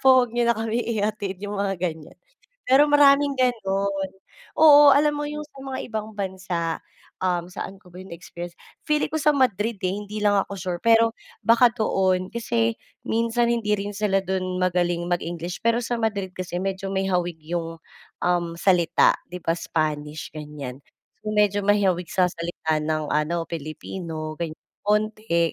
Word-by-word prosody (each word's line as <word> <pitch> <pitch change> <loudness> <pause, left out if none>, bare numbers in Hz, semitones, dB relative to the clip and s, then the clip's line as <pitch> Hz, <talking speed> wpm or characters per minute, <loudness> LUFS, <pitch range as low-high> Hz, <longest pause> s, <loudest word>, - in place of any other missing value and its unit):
po, 265 - +4 0.2
'wag 235 - -12
niyo 240 0 +1
na 235 - +3
kami 225 +1 -1 0.2
ihatid." 205 -2 -2
yung 205 0 -4
mga 195 -1 -1
ganiyan. 160 -3 -5 0.5
Pero 270 +3 +7
maraming 290 -1 +5
ganun, 200 -6 +1 0.7
oo. 295 -2 +9
Alam 295 +1 +4
mo 295 - -2
yung 300 0 -5
sa 285 - -26
mga 265 -1 -4
ibang 220 -1 -4
bansa, 185 -4 -3 0.4
um, 180 -2 0
saan 190 +1 -7
ko 180 - -19
ba 180 - -12
yun 190 - -12
na-experience, 175 0 -8 0.3
feeling 300 0 +1
ko 315 - -2
sa 300 +1 +4
Madrid 230 -5 +1
eh, 185 0 -1
hindi 210 +1 -6
lang 205 -1 +3
ako 195 - -2
sure. 175 -1 -4
Pero 230 0 +4 0.3
baka 235 +1 +5
doon 190 -5 +1
kasi 230 -1 0 0.3
minsan 230 +1 +1
hindi 220 -3 0
rin 200 0 -5
sila 200 -2 +2
dun 185 -1 -2
magaling 175 -1 0
mag-English. 175 +1 -3
Pero 230 +1 +3
sa 240 0 -2
Madrid 205 -5 -2
kasi 180 -1 -4
medyo 195 0 -3
may 190 0 0
hawig 175 -3 -1
yung, 165 0 -4 0.4
um, 175 -1 +1
salita, 180 -4 +4 0.2
'di 180 - -5
ba, 165 0 0
Spanish, 155 -2 -2
ganiyan. 150 -4 -7 0.4
Medyo 210 -1 +2
may 205 +1 +4
hawig 180 -2 +1
sa 180 -1 +3
salita 165 -2 -2
ng 155 0 -2
ano, 165 +3 0
Pilipino, 155 0 -6
ganiyan, 160 -2 -4 0.3
konte, 210 -5 +1
195 Hz, 165 wpm, -24 LUFS, 175-225 Hz, 0.7 s, oo